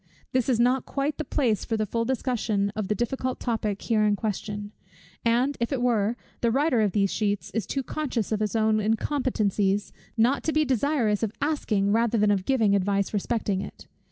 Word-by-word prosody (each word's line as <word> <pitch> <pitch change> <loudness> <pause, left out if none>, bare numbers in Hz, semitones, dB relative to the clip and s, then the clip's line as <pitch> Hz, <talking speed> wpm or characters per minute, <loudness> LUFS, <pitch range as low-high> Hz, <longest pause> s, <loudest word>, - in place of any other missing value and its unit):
This 255 0 +1
is 240 -3 +2
not 250 +2 +2
quite 285 +2 -2
the - - 0
place 235 -8 0
for 225 - -2
the 215 - 0
full 230 +3 -1
discussion 230 -5 0
of 215 -2 -2
the 210 - 0
difficult 255 +2 -2
topic 215 -4 -2
here 220 -2 +2
in 210 -1 +3
question: 205 -1 -4 0.5
and 245 +4 +2
if 235 +3 -1
it 270 - 0
were, 230 -2 +1 0.2
the 235 - +2
writer 265 -1 +2
of 205 -3 +1
these 200 -2 +2
sheets 205 -2 -1
is 225 -4 -2
too 270 - -2
conscious 255 -7 -3
of 215 - +1
his 215 0 -1
own 220 -1 +3
incompetencies, 215 -3 0 0.3
not 245 +5 +3
to 315 - +2
be 310 0 +3
desirous 255 -5 +1
of 225 -3 0
asking 220 -10 0
rather 230 +1 +2
than 210 -1 +3
of 195 -2 0
giving 225 -7 +3
advice 200 +1 0
respecting 205 -2 -1
it. - - -9
225 Hz, 195 wpm, -26 LUFS, 205-255 Hz, 0.5 s, in